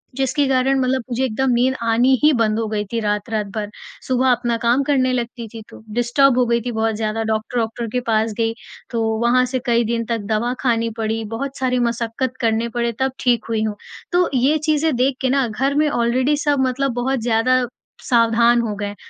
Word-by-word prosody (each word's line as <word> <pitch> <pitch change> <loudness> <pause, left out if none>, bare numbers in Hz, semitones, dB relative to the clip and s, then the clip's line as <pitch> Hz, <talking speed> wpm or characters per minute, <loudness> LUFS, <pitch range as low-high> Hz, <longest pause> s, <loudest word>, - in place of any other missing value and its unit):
जिसके 270 +2 +1
कारण 265 +1 +2
मतलब 260 0 +1
मुझे 245 +2 -1
एकदम 260 +2 0
नींद 250 +2 +2
आनी 230 +3 +3
ही 305 - +7
बंद 220 -1 +1
हो 225 - -1
गई 210 -1 -1
थी 230 - -1
रात-रात 210 +1 -1
भर। 210 -1 -3 0.4
सुबह 260 0 +2
अपना 240 -1 0
काम 240 +4 +2
करने 260 -2 +1
लगती 235 -1 -4
थी 225 - -7
तो - - -13
डिस्टर्ब 245 +3 +3
हो 250 - +3
गई 235 0 +1
थी 245 - -2
बहुत 220 0 0
ज़्यादा। 220 +1 -2
डॉक्टर-वॉक्टर 225 +1 -2
के 250 - +1
पास 220 0 +1
गई 225 0 +1 0.4
तो 230 -2 -1 0.2
वहाँ 245 +2 +3
से 255 - +1
कई 235 0 +3
दिन 230 -1 -1
तक 230 - 0
दवा 235 +3 0
खानी 230 -2 +1
पड़ी। 225 0 -2
बहुत 275 +3 -5
सारी 255 -1 +1
मशक्कत 235 +2 -3
करने 230 0 +1
पड़े 235 0 +1
तब 265 0 +1
ठीक 240 -3 +1
हुई 220 -1 0
हूँ। 215 -1 -2 0.4
तो 355 0 +2
ये 270 +5 +3
चीज़ें 310 -1 +2
देख 255 +2 +1
के 260 - +1
ना 270 -2 +2
घर 270 +6 -1
में 300 +1 +3
ऑलरेडी 255 +3 +1
सब 285 -2 +2
मतलब 265 +1 -1
बहुत 265 +1 0
ज़्यादा 245 +2 +2 0.4
सावधान 235 0 +3
हो 220 -3 -2
गए 205 0 -4
हैं 205 - -7
240 Hz, 205 wpm, -20 LUFS, 225-260 Hz, 0.4 s, ही